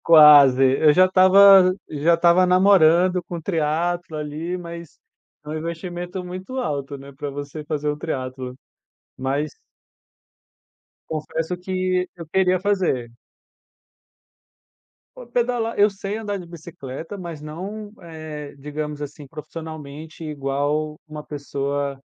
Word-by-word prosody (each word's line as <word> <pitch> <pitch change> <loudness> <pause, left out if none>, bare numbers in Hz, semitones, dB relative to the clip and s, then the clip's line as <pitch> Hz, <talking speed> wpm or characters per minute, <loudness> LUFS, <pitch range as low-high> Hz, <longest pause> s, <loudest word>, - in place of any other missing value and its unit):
Quase. 145 -5 +8 0.2
Eu 155 -1 +6
já 185 +4 +6
estava 190 0 +7 0.2
já 155 +3 +2
estava 170 +2 +4
namorando 180 -1 +4
com 175 - -7
o 170 - -6
triatlo 165 0 -1
ali, 155 +4 -4
mas 170 -2 -9 0.5
é - - -9
um 155 - -3
investimento 175 +3 -5
muito 185 +8 -7
alto, 140 - -3
né, 140 +1 -12
pra 145 +1 -5
você 145 +2 -7
fazer 150 -1 -3
o 150 0 -1
triatlo. 130 -4 -5 0.6
Mas 140 +3 -2 1.5
confesso 160 +2 -3
que 185 0 -1
eu 170 -2 -9
queria 185 +2 +2
fazer. 180 - 0 2.0
Pô, - - -11
pedalar 240 -2 -1
eu 205 +1 +5
sei 195 +1 -5
andar 205 -2 -3
de 180 - -9
bicicleta, 165 0 -8
mas 170 -5 -7
não 195 +8 -7
é, 155 -4 -8
digamos 150 +1 -6
assim, 145 0 -8
profissionalmente, 155 +1 -9
igual 150 +1 -2
a - - -22
uma 150 0 -7
pessoa 140 -1 -3
160 Hz, 125 wpm, -22 LUFS, 150-185 Hz, 2.0 s, Quase